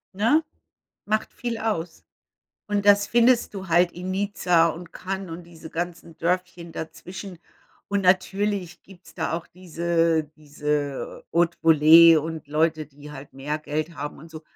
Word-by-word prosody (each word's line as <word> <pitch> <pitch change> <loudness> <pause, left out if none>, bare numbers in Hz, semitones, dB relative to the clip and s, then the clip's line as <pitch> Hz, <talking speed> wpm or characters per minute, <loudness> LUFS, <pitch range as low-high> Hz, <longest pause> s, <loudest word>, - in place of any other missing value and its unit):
Ne, 230 +10 +3 0.6
macht 215 +1 -1
viel 235 -2 -4
aus? 175 -7 -3 0.6
Und 205 -1 -1
das 205 0 +5
findest 240 0 +3
du 195 -2 -7
halt 175 +1 +3
in 180 +2 -6
Nizza 185 -4 +2
und 170 +1 -7
Cannes 190 0 -5
und 170 +2 -7
diese 165 -2 -13
ganzen 170 -1 -5
Dörfchen 180 0 -2
dazwischen. 180 +3 -8 0.5
Und 200 -1 0
natürlich 190 -1 0
gibt's 185 -1 -16
da 160 - -2
auch 165 +1 -4
diese 170 -2 0
diese 150 -2 -3
Hautevolee 165 -1 +6
und 160 0 -3
Leute, 155 +1 0
die 145 +1 -13
halt 140 -1 -10
mehr 145 +3 -4
Geld 155 +2 -4
haben 145 +1 -6
und 160 +3 -13
so. 160 0 -10
170 Hz, 145 wpm, -24 LUFS, 160-190 Hz, 0.6 s, Hautevolee